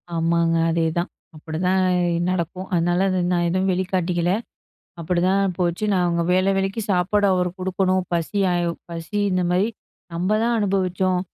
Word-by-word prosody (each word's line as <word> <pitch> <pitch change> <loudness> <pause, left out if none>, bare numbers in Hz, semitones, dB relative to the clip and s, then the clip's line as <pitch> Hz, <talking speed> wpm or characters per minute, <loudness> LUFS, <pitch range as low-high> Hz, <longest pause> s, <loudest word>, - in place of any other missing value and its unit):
ஆமாங்க 165 0 +2
அதேதான். 165 +1 0 0.3
அப்டிதான் 180 +5 -1 0.5
நடக்கும். 185 +1 -3
அதனால 175 +1 +2 0.3
நான் 175 -1 +1
எதுவும் 185 +2 +1
வெளிக்காட்டிக்கில. 180 -2 0 0.7
அப்படிதான் 185 +3 +1
போச்சு. 175 +3 0
நான் 185 -2 +2
அவங்க 170 -1 0
வேள 185 +1 +2
வேளைக்கு 195 +3 -1
சாப்பாடு 200 +3 +2
அவரு 180 -1 +1
குடுக்கணும். 185 0 0
பசியா 185 +3 0 0.4
பசி 170 +4 -6
இந்தமாரி 180 +2 +1 0.5
நம்ப 180 +4 -1
தான் 235 0 +1
அனுபவிச்சோம். 185 -2 0
180 Hz, 120 wpm, -22 LUFS, 170-190 Hz, 0.7 s, ஆமாங்க